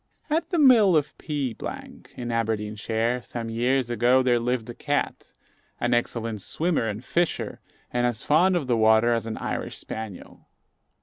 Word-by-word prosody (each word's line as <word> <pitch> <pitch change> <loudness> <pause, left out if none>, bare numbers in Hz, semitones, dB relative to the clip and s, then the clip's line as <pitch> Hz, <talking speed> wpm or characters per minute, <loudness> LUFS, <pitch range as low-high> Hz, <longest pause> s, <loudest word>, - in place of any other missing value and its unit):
At 320 +2 0
the 350 - 0
mill 230 - +6
of 150 0 -1
P, 145 -6 -3 0.6
in 120 -1 -4
Aberdeenshire, 110 +1 -1
some 115 +1 -6
years 120 +2 +1
ago, 120 +3 +3
there 120 -2 +3
lived 120 -1 -1
a - - -8
cat, 145 +4 -2 0.5
an 120 0 +1
excellent 115 -2 -1
swimmer 160 - -1
and 105 +3 -5
fisher, 175 -1 -1 0.3
and 120 0 +2
as 120 -2 -3
fond 180 +5 +4
of 165 -5 0
the 125 -2 +1
water 110 +2 +4
as 115 -1 -1
an 110 - -4
Irish - - -4
spaniel. 110 -4 -8
120 Hz, 160 wpm, -25 LUFS, 115-145 Hz, 0.6 s, mill